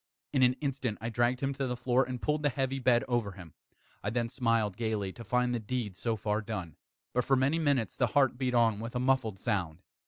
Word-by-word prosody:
In 135 - +3
an 125 0 +6
instant 135 -6 -2
I 115 - -3
dragged 120 +2 +1
him 135 0 0
to 135 0 -2
the 125 -1 -2
floor, 125 +1 +2
and 130 -2 -5
pulled 150 +4 0
the 145 - +2
heavy 135 0 -1
bed 125 -2 +3
over 120 -5 0
him. 90 -4 -12 0.5
I 100 - 0
then 120 +1 -1
smiled 115 -5 +1
gaily, 110 -3 -1
to 115 - -9
find 125 +3 +1
the 120 - 0
deed 110 -3 -3
so 115 +3 -1
far 105 0 -1
done. 95 -8 -5 0.4
But, 125 - +2
for 135 - +3
many 135 +5 +2
minutes, 140 -7 +1
the 125 - +2
heart 135 +1 +3
beat 125 -1 -1
on 115 -3 +3
with 115 +2 -6
a - - +1
muffled 130 -5 +1
sound. 90 -3 -2
120 Hz, 230 wpm, -30 LUFS, 110-130 Hz, 0.5 s, an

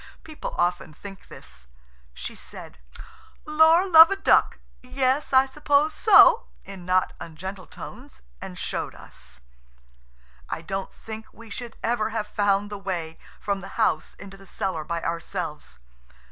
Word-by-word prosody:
People 310 -1 -7
often 175 -3 -1
think 195 +2 -11
this. 60 0 -15 0.5
She - - -7
said: 65 - -12 0.7
"Lor, 320 +4 +5
love 325 -2 +9
a 395 - 0
duck–yes, 260 -6 0
I 260 0 +6
suppose 290 +2 +1
so," 440 +1 +6 0.2
in 190 -3 -10
not 185 0 +2
ungentle 185 +4 -8
tones, 60 - -11 0.2
and - - -8
showed - - -4
us. - - -14 1.1
I 160 - -4
don't 195 +3 -4
think 220 0 -9
we 230 -1 -15
should 235 +1 -7
ever 225 -2 0
have 220 -1 -3
found 205 0 0
the 205 - -6
way 175 -5 -5 0.2
from 200 -1 -2
the 195 - -11
house - - 0
into 195 0 -12
the 195 0 -16
cellar 185 -5 -3
by 170 +2 -4
ourselves. 165 - -5
200 Hz, 140 wpm, -25 LUFS, 175-260 Hz, 1.1 s, love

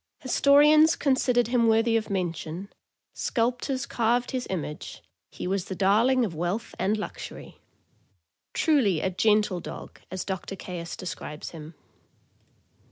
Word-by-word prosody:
Historians 300 +3 +5
considered 250 -4 +2
him 240 -2 +3
worthy 225 +1 +3
of 220 -1 0
mention, 175 0 -4 0.4
sculptors 250 +3 -1
carved 240 +1 0
his 255 -1 -3
image, 155 -5 -5 0.3
he - - -7
was 190 0 -1
the 190 - -5
darling 225 +7 +3
of 190 - -5
wealth 175 +8 -3
and 210 +3 +1
luxury; 210 - -8 0.9
truly 255 - +2
a 190 - -1
"gentle 210 -1 +2
dogge," - - -9
as 185 0 -4
Doctor 190 0 -4
Caius 175 -3 -6
describes 150 -4 -6
him. 160 -1 -10
210 Hz, 125 wpm, -26 LUFS, 180-245 Hz, 0.9 s, Historians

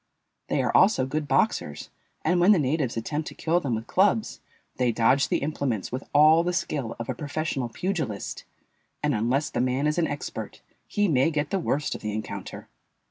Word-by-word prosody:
They - - 0
are - - -1
also 185 -9 +5
good 150 +2 -3
boxers, 75 - 0 0.3
and 175 +3 +2
when 185 +4 +6
the - - +3
natives 140 -4 0
attempt 150 +7 -3
to - - -8
kill 170 +2 +1
them 135 -8 -1
with 110 +1 -5
clubs 205 - +1 0.4
they 125 -2 +2
dodge 120 +5 +3
the - - 0
implements 140 -8 -2
with 130 +2 -4
all 155 +3 +6
the 180 +1 -1
skill 145 -9 -2
of 115 - -6
a 130 - -1
professional 145 -2 -3
pugilist, 155 - -3 0.6
and - - +2
unless 125 +7 0
the 120 - 0
man 130 +3 0
is 150 +3 +1
an 165 - +2
expert 145 - -6 0.3
he 205 -1 +1
may 135 -2 +3
get 150 -2 -2
the 195 - +1
worst 150 -3 -1
of - - -7
the 105 -1 -3
encounter. 110 +1 -6
145 Hz, 190 wpm, -26 LUFS, 125-165 Hz, 0.6 s, when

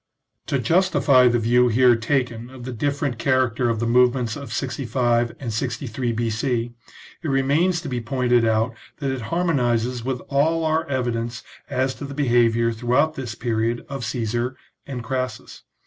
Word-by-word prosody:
To 140 - +1
justify 145 -4 +4
the 120 0 +3
view 120 +2 +3
here 120 +1 +5
taken 120 -1 -1
of 130 -1 -11
the 130 - -5
different 140 0 -2
char 130 0 +3
acter 120 +1 -1
of 115 -2 -1
the 115 - -1
movements 125 -1 +3
of 140 -1 -8
65 120 -2 0
and 120 -5 -4
63 120 +1 -2
B.C. 115 +1 -1 0.5
it 165 - -4
remains 145 +6 +2
to 165 - -7
be 125 -3 -2
pointed 120 0 +1
out 110 +1 +1 0.2
that 140 -2 -2
it 130 -1 -3
harmonizes 125 -8 0
with 130 0 -2
all 160 +4 +1
our 160 +1 +1
evi 130 -3 -1
dence 115 0 -4 0.3
as 130 +1 0
to 145 - -8
the 140 0 -7
behaviour 120 -4 +3
throughout 125 +7 +1
this 120 -6 -6
period 115 0 -1
of 135 -3 -5
Caesar 120 +3 -2 0.3
and 125 -4 -5
Crassus. 130 0 -4
125 Hz, 165 wpm, -23 LUFS, 115-135 Hz, 0.5 s, here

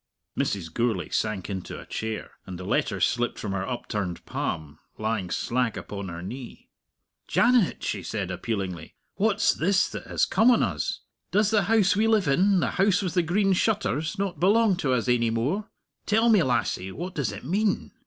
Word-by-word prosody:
Mrs. 85 -5 -2
Gourlay 120 -1 0
sank 100 -4 -1
into 95 -3 -5
a - - -11
chair, 110 -1 -4 0.2
and 90 -2 -6
the 90 - -7
letter - - 0
slipped 120 0 +1
from 105 - -4
her 95 -1 -2
upturned 105 -7 -4
palm, 75 -2 -4 0.2
lying 110 -4 -2
slack 125 +2 -1
upon 100 -2 -6
her 85 0 -7
knee. 125 +5 -9 0.6
"Janet," 240 -5 +3
she - - -2
said, 100 -4 -3
appealingly, 95 -3 -4 0.2
"what's 205 +1 +3
this 195 +4 +2
that - - -7
has - - +2
come 225 +3 +4
on 245 - +5
us? - - -2 0.3
Does 210 +1 +2
the 210 -4 +3
house 210 -3 +3
we 215 +2 +2
live 215 -6 +3
in, 185 +6 +3
the - - 0
House 200 0 +3
with 180 - -2
the 180 - +3
Green 195 +4 +2
Shutters, 185 - 0
not 195 -2 -2
belong 205 +2 +4
to 145 -8 0
us 125 -1 +1
ainy 120 -2 +2
more? 145 - -1 0.4
Tell 225 +2 +3
me, 215 -4 +6
lassie. 120 - 0
What 175 - -6
does 140 -9 -1
it 100 - -8
mean?" 200 - 0
135 Hz, 185 wpm, -26 LUFS, -, 0.6 s, me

